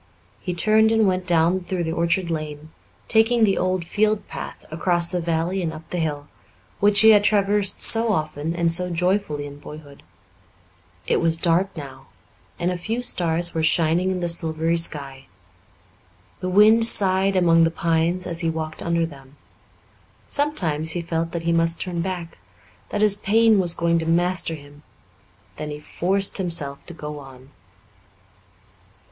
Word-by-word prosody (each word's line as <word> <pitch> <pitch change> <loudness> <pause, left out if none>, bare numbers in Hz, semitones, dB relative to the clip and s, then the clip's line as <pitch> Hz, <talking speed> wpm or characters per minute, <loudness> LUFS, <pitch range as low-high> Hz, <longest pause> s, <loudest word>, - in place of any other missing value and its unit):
He 180 -2 -5
turned 220 +4 +3
and 225 -1 +2
went 185 -1 -1
down 170 +1 +2
through 180 -1 -4
the 160 - -3
orchard 170 +1 -1
lane, 155 -1 -6 0.4
taking 225 +1 +2
the 195 -3 +3
old 185 -1 -2
field 210 +3 -1
path - - -9
across 175 +1 +1
the 175 +1 -3
valley 170 +3 -2
and 165 -2 -3
up 160 0 -11
the 180 - -3
hill, 145 -3 -4 0.5
which 205 0 +5
he 220 0 +7
had 205 -1 +4
traversed 205 -1 +2
so 225 0 +4
often 155 -2 -3
and 170 -1 0
so 180 +1 0
joyfully 180 -3 -1
in 145 0 -11
boyhood. 145 -1 -13 1.0
It - - 0
was 165 -1 +2
dark 175 +2 0
now, 135 -3 -10 0.5
and 175 +2 -2
a 180 - -5
few 225 +7 -4
stars 170 -5 -1
were 160 - -2
shining 165 +3 +1
in 185 -1 -3
the 175 - -1
silvery 165 -1 +1
sky. 140 -5 -3 1.1
The 185 - -4
wind 215 +4 +5
sighed 195 -3 +3
among 165 -2 +3
the 165 - +3
pines 165 +2 -1
as 170 -1 -2
he 165 -3 0
walked 160 -1 -5
under 170 0 -1
them. 140 -3 -14 0.9
Sometimes 165 - +1
he 175 - -3
felt 165 0 -3
that 170 -1 -5
he 170 - 0
must 165 0 +1
turn 175 -2 -4
back 175 -2 -6 0.5
that 205 - -3
his 205 -1 +5
pain 220 +1 +2
was 175 -2 +3
going 170 0 0
to 160 - -5
master 175 0 +2
him; 145 -1 -16 0.8
then 150 - -6
he 150 0 -7
forced 195 +6 0
himself 165 -6 0
to 175 - -9
go 150 -2 -8
on. 135 -1 -15
170 Hz, 165 wpm, -22 LUFS, 160-190 Hz, 1.1 s, he